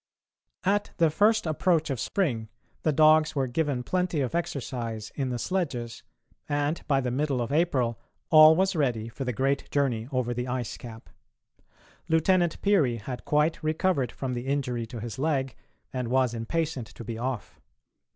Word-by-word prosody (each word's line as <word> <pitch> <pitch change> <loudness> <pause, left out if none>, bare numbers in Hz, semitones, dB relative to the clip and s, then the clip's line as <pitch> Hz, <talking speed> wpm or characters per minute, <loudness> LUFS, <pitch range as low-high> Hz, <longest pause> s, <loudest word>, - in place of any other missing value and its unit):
At 205 +2 +1
the 165 -2 +4
first 215 +6 +3
approach 160 -1 +1
of 130 - -2
spring 120 - -1 0.3
the 155 - +2
dogs 155 +1 +5
were 135 -2 +1
given 135 0 -1
plenty 180 0 0
of 130 - -2
exercise 125 -10 -3
in 135 -3 -2
the 125 - -2
sledges, 125 -8 -3 0.5
and 145 +2 0
by 135 -2 +2
the 125 -1 -2
middle 140 0 0
of 120 +1 -2
April 135 - +1 0.3
all 155 0 +9
was 190 +2 +1
ready 120 -7 0
for 135 +4 -6
the 125 - 0
great 135 +4 -1
journey 125 -6 0
over 125 -2 0
the 125 +1 -3
ice 125 -2 -3
cap. 115 -2 -10 1.0
Lieutenant 170 +1 +2
Peary 170 -12 +3
had 125 +3 -7
quite 150 +2 +1
recovered 155 -4 0
from 130 -2 -4
the 120 +1 -4
injury 125 -4 -1
to 120 0 -7
his 115 +1 -6
leg, 135 -4 0 0.4
and 125 -2 -2
was 130 -1 +2
impatient 130 +2 -2
to 120 - -11
be 115 -1 -5
off. 125 -2 -4
135 Hz, 165 wpm, -27 LUFS, 120-160 Hz, 1.0 s, all